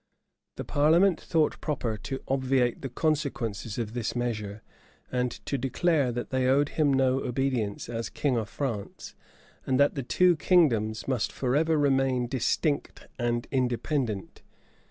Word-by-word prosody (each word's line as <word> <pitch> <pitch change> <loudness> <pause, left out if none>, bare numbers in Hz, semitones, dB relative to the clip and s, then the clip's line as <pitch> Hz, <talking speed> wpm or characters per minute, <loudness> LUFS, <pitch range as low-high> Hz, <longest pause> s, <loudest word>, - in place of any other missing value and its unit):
The - - -5
parliament 165 +5 +3
thought 160 -2 0
proper 125 -8 -2
to 130 +5 -6
obviate 130 -2 +1
the 135 - -4
consequences 125 -7 -2
of 115 -2 -3
this 120 -1 -3
measure, 110 -4 -3 0.5
and 125 0 0 0.2
to 140 - -2
declare 140 +1 +1
that 120 0 -5
they 130 -1 +1
owed 140 +2 +3
him 150 -3 +2
no 135 -1 +2
obedience 125 -5 -2
as 115 -1 -4
king 140 -4 0
of 110 -2 -2
France, 115 -8 -5 0.5
and 130 0 0
that 140 0 +4
the 140 - -3
two 175 +7 +3
kingdoms 115 - +2
must 130 -5 0
forever 150 +5 +1
remain 135 -3 +2
distinct 135 +4 -1
and 120 -1 -1
independent. 125 - -1
130 Hz, 140 wpm, -27 LUFS, 120-145 Hz, 0.5 s, that